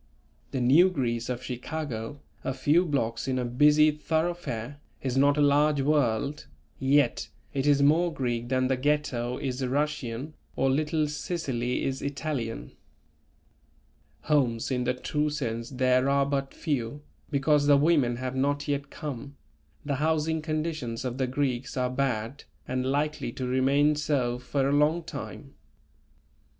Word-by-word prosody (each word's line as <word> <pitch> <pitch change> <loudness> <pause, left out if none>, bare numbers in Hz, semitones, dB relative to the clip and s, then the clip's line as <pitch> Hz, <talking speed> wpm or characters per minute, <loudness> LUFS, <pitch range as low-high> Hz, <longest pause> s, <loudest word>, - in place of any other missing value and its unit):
The 130 - -2
New 150 +10 +6
Greece 120 -8 -2
of 125 0 -3
Chicago, 130 0 -5 0.2
a 135 - -2
few 150 +7 +3
blocks 115 -5 -1
in 130 -1 0
a 125 - -1
busy 150 +5 +5
thoroughfare, 150 -5 -2 0.2
is 130 -2 -1
not 140 +2 +4
a - - +3
large 145 0 +3
world, 140 -1 0 0.3
yet 135 -1 +2 0.2
it 135 0 0
is 140 -1 +4
more 165 +4 +4
Greek 120 -5 -2
than 130 0 +2
the 130 0 +1
Ghetto 130 -3 0
is 130 -1 -3
Russian 140 0 -2 0.2
or 135 - +2
Little 155 +2 +1
Sicily 135 -6 -2
is 135 0 -2
Italian. 140 - -3 1.5
Homes 130 -6 +1
in 125 -1 0
the 125 +1 +1
true 150 +4 -1
sense 115 -6 -3
there 130 0 +2
are 140 0 +3
but 140 -1 -1
few, 145 -2 -3 0.3
because 145 +1 +2
the 145 -1 +7
women 145 -5 +3
have 130 +1 -4
not 145 +2 0
yet 140 -1 -2
come; 140 -2 -7 0.5
the 140 -2 -1
housing 160 +1 +1
conditions 155 -6 -3
of 125 +1 -3
the 130 - +1
Greeks 130 -1 -2
are 125 0 0
bad 130 0 -2 0.2
and 130 0 -1
likely 145 -1 -1
to 130 - -4
remain 135 +4 +3
so 140 -5 0
for 135 +2 -1
a - - +1
long 150 +4 +3
time. 145 -3 -8
140 Hz, 145 wpm, -27 LUFS, 125-150 Hz, 1.5 s, the